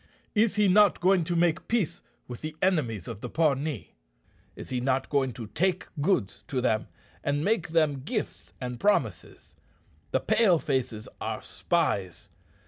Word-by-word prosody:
Is 220 Hz, -1 st, +3 dB
he 210 Hz, -1 st, +4 dB
not 200 Hz, +1 st, +5 dB
going 185 Hz, 0 st, +4 dB
to 175 Hz, -, -1 dB
make 170 Hz, +1 st, +1 dB
peace 225 Hz, -8 st, 0 dB, 0.3 s
with 120 Hz, -2 st, -8 dB
the 155 Hz, 0 st, -5 dB
enemies 130 Hz, -, 0 dB
of 115 Hz, -2 st, -7 dB
the 125 Hz, -, -5 dB
Pawnee? 145 Hz, -4 st, 0 dB, 0.6 s
Is -, -, -9 dB
he 125 Hz, -1 st, -1 dB
not 130 Hz, +1 st, 0 dB
going 135 Hz, -3 st, +2 dB
to 115 Hz, +1 st, -7 dB
take 180 Hz, -, -1 dB
goods 105 Hz, -, 0 dB
to 130 Hz, -, -1 dB
them, 110 Hz, -4 st, +1 dB, 0.4 s
and 145 Hz, +2 st, 0 dB
make 210 Hz, -4 st, +1 dB
them 155 Hz, -4 st, +2 dB
gifts 210 Hz, -, -4 dB
and 125 Hz, -2 st, -5 dB
promises? 210 Hz, -, -1 dB, 0.6 s
The -, -, +1 dB
Pale 195 Hz, -7 st, +4 dB
faces 130 Hz, -7 st, -2 dB
are -, -, -3 dB
spies. 95 Hz, -4 st, -1 dB
150 Hz, 155 wpm, -28 LUFS, 125-185 Hz, 0.6 s, not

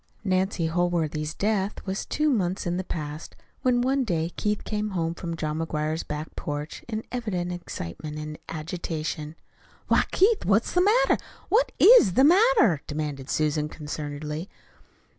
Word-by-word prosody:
Nancy 185 Hz, -2 st, +1 dB
Holworthy's 160 Hz, -3 st, 0 dB
death 205 Hz, -1 st, -1 dB
was 190 Hz, 0 st, -3 dB
two 300 Hz, 0 st, +1 dB
months 190 Hz, -6 st, 0 dB
in 175 Hz, 0 st, -1 dB
the 185 Hz, -, -2 dB
past 150 Hz, -3 st, -6 dB, 0.3 s
when 245 Hz, -1 st, +3 dB
one 265 Hz, +2 st, +2 dB
day 170 Hz, -6 st, -1 dB
Keith 210 Hz, 0 st, -1 dB
came 210 Hz, 0 st, -2 dB
home 165 Hz, 0 st, 0 dB
from 170 Hz, -1 st, -5 dB
John 155 Hz, -1 st, -2 dB
McGuire's 155 Hz, 0 st, -1 dB
back 150 Hz, +1 st, -6 dB
porch 145 Hz, +1 st, -5 dB
in 220 Hz, -2 st, -3 dB
very -, -, -27 dB
evident 195 Hz, -8 st, -2 dB
excitement 150 Hz, -, -6 dB
and 150 Hz, 0 st, -6 dB
agitation. 155 Hz, -1 st, -4 dB, 0.5 s
"Why, -, -, +4 dB
Keith, 410 Hz, +3 st, +3 dB
what's 205 Hz, +4 st, +2 dB
the 360 Hz, -, +4 dB
matter? 475 Hz, +6 st, +4 dB, 0.3 s
What 445 Hz, +7 st, +3 dB
IS 405 Hz, -, +8 dB
the 265 Hz, -, +5 dB
matter?" 340 Hz, -, +5 dB
demanded 145 Hz, -3 st, -4 dB
Susan 150 Hz, 0 st, 0 dB
concernedly. 150 Hz, +2 st, -5 dB
175 Hz, 150 wpm, -26 LUFS, 155-215 Hz, 0.5 s, IS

